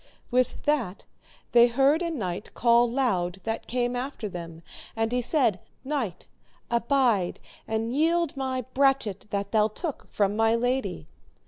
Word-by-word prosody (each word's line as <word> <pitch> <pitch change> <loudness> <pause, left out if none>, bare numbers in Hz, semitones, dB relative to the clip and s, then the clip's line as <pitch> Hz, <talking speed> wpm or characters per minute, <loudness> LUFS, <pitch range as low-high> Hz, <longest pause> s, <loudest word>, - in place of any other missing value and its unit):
With 250 0 +1
that 250 -10 0 0.5
they 240 0 +7
heard 275 +7 +3
a 340 - -1
knight 205 - -4
call 235 0 +4
loud 195 -8 0
that 225 0 -3
came 245 0 0
after 250 -3 -4
them, 170 -3 -8 0.3
and 225 0 0
he 250 0 +1
said, 240 - +2 0.2
Knight, 260 - -3 0.5
abide 235 -6 +2 0.3
and 225 +2 -1
yield 330 +1 +2
my 260 -1 -2
brachet 260 -8 +1
that 200 -1 -3
thou 215 -1 +4
took 290 - -5
from 205 0 +1
my 225 +1 +3
lady. 245 - -1
235 Hz, 140 wpm, -26 LUFS, 210-270 Hz, 0.5 s, they